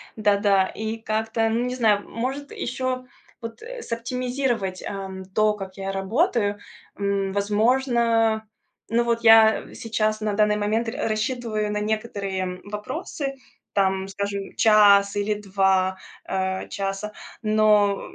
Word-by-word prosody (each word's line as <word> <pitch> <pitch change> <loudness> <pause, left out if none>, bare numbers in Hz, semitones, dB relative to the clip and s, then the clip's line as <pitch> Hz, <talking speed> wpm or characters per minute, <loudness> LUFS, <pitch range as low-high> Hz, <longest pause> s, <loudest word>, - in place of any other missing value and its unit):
Да-да. 200 -2 +3
И 220 +1 -4
как-то, 225 0 -1
ну, 235 +2 0
не 250 - -2
знаю, 215 -5 +2
может 265 +5 -4
ещё 255 0 -3 0.4
вот, 230 - -8
э, - - -8
сооптимизировать, 240 -4 -2
эм, 190 -1 -6
то, 215 +3 +2
как 195 -2 -8
я 195 0 -3
работаю. 205 - +1 0.4
М, 200 -1 -1
возможно, 225 +1 +2 0.4
ну, 235 +1 +2
вот 235 0 0
я 225 -1 +6
сейчас 215 -1 -1
на 210 -1 -1
данный 210 0 +3
момент 215 +3 0
рас 225 - -2
рассчитываю 215 -2 -1
на 210 - -1
некоторые 200 -4 -3
вопросы, 275 - -5 0.4
там, 190 -1 +1
скажем, 200 0 -4
час 205 -2 +5
или 205 +1 0
2, 190 -2 +1 0.3
э, 190 0 -2
часа, 195 +1 -3 0.3
но, 210 -2 +3
215 Hz, 125 wpm, -24 LUFS, 200-230 Hz, 0.4 s, я